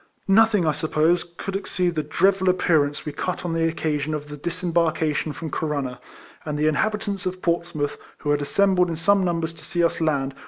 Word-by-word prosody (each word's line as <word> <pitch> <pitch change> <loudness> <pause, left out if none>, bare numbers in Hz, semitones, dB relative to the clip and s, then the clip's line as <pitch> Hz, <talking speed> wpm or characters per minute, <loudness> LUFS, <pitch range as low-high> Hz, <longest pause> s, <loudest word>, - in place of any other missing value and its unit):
Nothing, 210 -2 +4
I 155 - +3
suppose, 155 +3 +1
could 175 +3 -7
exceed 180 -3 -1
the 155 - 0
dreadful 190 +3 +2
appearance 155 -5 +2
we 150 - -3
cut 180 +5 -3
on 170 - -1
the 165 0 +2
occasion 155 -2 -1
of 150 0 -6
the 150 - -6
disembarkation 165 -1 0
from 160 +1 -6
Corunna; 140 -5 -2 0.4
and 150 -1 -3
the 150 - +1
inhabitants 200 +4 0
of 185 0 -4
Portsmouth, 170 -4 -1 0.2
who 145 - -2
had 145 0 +1
assembled 180 +3 +2
in 165 - -2
some 195 +4 +3
numbers 165 -2 -1
to - - -14
see 175 -1 -1
us 170 0 +1
land, 160 - +3
RIFLEMAN 135 -2 -1
HARKIS. 140 - -20
165 Hz, 200 wpm, -23 LUFS, 150-180 Hz, 0.4 s, Nothing